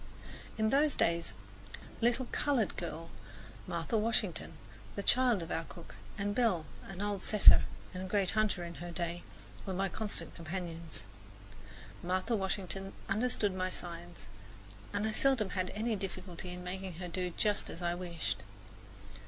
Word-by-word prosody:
In 220 0 +3
those 290 +2 +4
days 170 0 +1 0.4
a - - -12
little 245 +2 +3
coloured 270 -8 +2
girl, 165 -1 -5 0.6
Martha 230 - -1
Washington, 225 +1 0 0.4
the 200 - -2
child 245 -7 +4
of 165 - -7
our 165 - 0
cook, 170 -1 -11 0.2
and 205 0 0
Belle, 205 -9 +3 0.2
an 195 +1 -4
old 205 -2 -1
setter, 210 +1 +8 0.3
and 185 - -4
a - - -3
great 195 -1 +3
hunter 215 -4 +1
in 170 0 -5
her 175 - -4
day, 170 0 -2 0.4
were 190 -2 -3
my 195 +1 +1
constant 215 +3 -2
companions. 170 -1 -5 1.0
Martha 185 +6 +1
Washington 195 -1 -2 0.2
understood 210 -1 +2
my 185 0 0
signs, 175 -1 -6 0.7
and 205 +1 0
I 220 - +1
seldom 225 -3 +3
had 185 -1 0
any 220 +1 +1
difficulty 185 -2 -5
in 180 0 -6
making 185 0 -4
her 180 +2 -5
do 180 +1 -1
just 210 -1 +2
as 170 - -6
I 175 0 +2
wished. 175 -2 -2
190 Hz, 155 wpm, -34 LUFS, 175-215 Hz, 1.0 s, setter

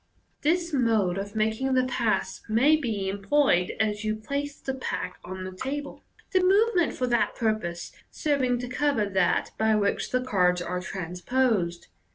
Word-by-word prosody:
This 340 +2 +1
mode 220 -8 +2
of 205 +2 -6
making 220 +5 0
the 255 - +4
pass 235 -3 -1
may 255 +8 +5
be 225 -10 -2
employed 200 -1 +2
as 210 0 0
you 215 0 0
place 280 +6 -4
the 265 - -3
pack 250 -8 -4
on 185 +1 -6
the 185 - -5
table, 275 +9 -5 0.3
the 370 - +3
move 405 +5 +4
ment 345 -4 +2
for 255 - -1
that 240 -2 +1
purpose 215 -7 -2 0.2
serv 290 -3 0
ing 250 -1 +2
to 245 - -4
cover 265 -3 +1
that 190 -3 +1
by 220 0 +3
which 200 -1 0
the 255 - +1
cards 180 -7 +2
are 180 +1 -3
transposed. 180 0 -1
220 Hz, 170 wpm, -26 LUFS, 190-270 Hz, 0.3 s, may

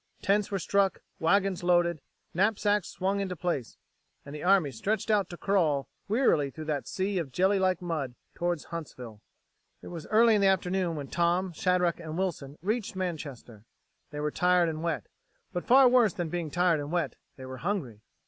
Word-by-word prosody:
Tents 205 0 +2
were 200 - -1
struck, 195 +1 +1 0.2
wagons 195 +2 +2
loaded, 175 -3 +2 0.3
knapsacks 205 +1 +1
swung 195 +2 -1
into 190 -2 -2
place... 170 -8 -3 0.5
and 140 - -9
the 150 - -6
army 180 -6 +4
stretched 205 - -1
out 200 -4 +2
to 175 - -8
crawl 160 -9 +1 0.2
wearily 205 - +2
through 155 +3 -8
that 150 -3 -2
sea 190 0 -1
of 150 -6 -4
jelly 190 +7 +2
like 185 -2 +1
mud 150 -8 -3 0.2
towards 175 -2 -2
Huntsville. 125 -9 -7 0.6
It - - -8
was 165 -3 -7
early 225 +1 +5
in 210 - +3
the 195 - +5
afternoon 185 -2 +1
when 140 -3 -6
Tom, 175 +1 +1
Shadrack, 180 0 +1
and 160 0 -6
Wilson 155 -7 -3
reached 215 +1 -1
Manchester. 145 - -5 0.5
They 150 - -7
were 150 0 -1
tired 180 -1 +3
and 155 -1 -4
wet, 170 -2 -2 0.5
but 175 - -3
far 260 +1 +7
worse 245 -6 +4
than 175 -2 -3
being 170 -1 -3
tired 175 0 +2
and 145 +1 -5
wet, 175 -1 -1 0.2
they 130 - -10
were 130 0 -7
hungry. 145 - -3
175 Hz, 180 wpm, -28 LUFS, 155-195 Hz, 0.6 s, far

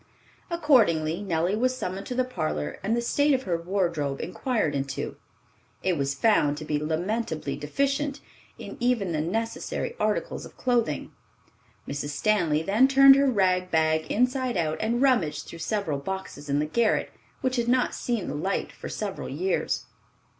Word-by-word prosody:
Accordingly, 210 - +3
Nellie 175 0 0
was 255 +3 +1
summoned 195 -4 -4
to 250 - -4
the 255 - +2
parlor 155 - -3
and 220 +4 0
the 235 - -1
state 285 +4 +3
of 260 - -2
her 180 -8 0
wardrobe 170 -6 -1
inquired 185 - -1
into. 135 -1 -3 0.7
It 185 -2 +2
was 140 -2 -1
found 145 -5 +3
to 155 - -6
be 150 -1 0
lamentably 160 -2 -2
deficient 275 - -1 0.4
in - - -8
even 240 -7 +1
the 155 -2 0
necessary 225 - -2
articles - - -1
of - - -12
clothing. 235 - 0 0.8
Mrs. 145 +1 -3
Stanley 160 -1 +1
then 215 +9 +4
turned 270 0 +8
her 275 0 +3
rag 185 -5 +2
bag 160 -1 +1
inside 250 0 +1
out 160 -2 -1
and 235 +4 +1
rummaged 165 - +2
through 165 - -10
several 160 -3 -1
boxes 150 -3 -6
in 140 - +2
the 150 - +1
garret 225 +8 +1 0.3
which 260 0 0
had 235 -1 0
not 250 +1 +2
seen 235 -6 -2
the - - -3
light 185 +7 -2
for - - -8
several - - -4
years. 380 +1 -1
190 Hz, 160 wpm, -26 LUFS, 155-245 Hz, 0.8 s, turned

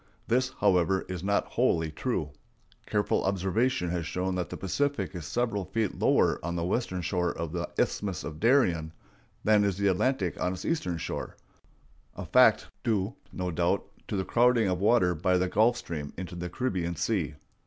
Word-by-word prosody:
This, 125 +2 +2
however, 95 -1 +3
is 90 -2 -5
not 100 +1 +1
wholly 80 -1 +1
true. - - -2 0.6
Careful 105 -1 +1
observation 95 +1 0
has 85 -2 -2
shown 95 +1 -2
that 90 -1 -2
the - - -6
Pacific 140 +6 -1
is 85 -4 -6
several 115 -5 -1
feet 105 +2 -2
lower - - +3
on 85 +1 -2
the 85 - -1
western 95 -2 -1
shore 90 0 0
of 85 -2 -5
the 85 0 -3
Isthmus 95 -3 -1
of 75 -1 -7
Darien 90 - +3 0.5
than 105 -1 +4
is 100 -2 0
the 100 - -1
Atlantic 100 -1 0
on 90 - +1
its 90 - -7
eastern 90 - -1
shore—a - - -9
fact - - +5 0.2
due, 105 -1 0 0.2
no 90 -1 -3
doubt, 85 +1 +1 0.2
to - - -3
the 95 -1 -1
crowding 120 -2 +3
of 90 -1 0
water 100 -3 +4
by 90 +3 +1
the 90 +1 +1
Gulf 115 +6 +3
Stream 75 -8 -6
into 90 0 -6
the 90 0 -5
Caribbean 90 -5 -2
Sea. 85 -5 -1
95 Hz, 175 wpm, -28 LUFS, 85-110 Hz, 0.6 s, fact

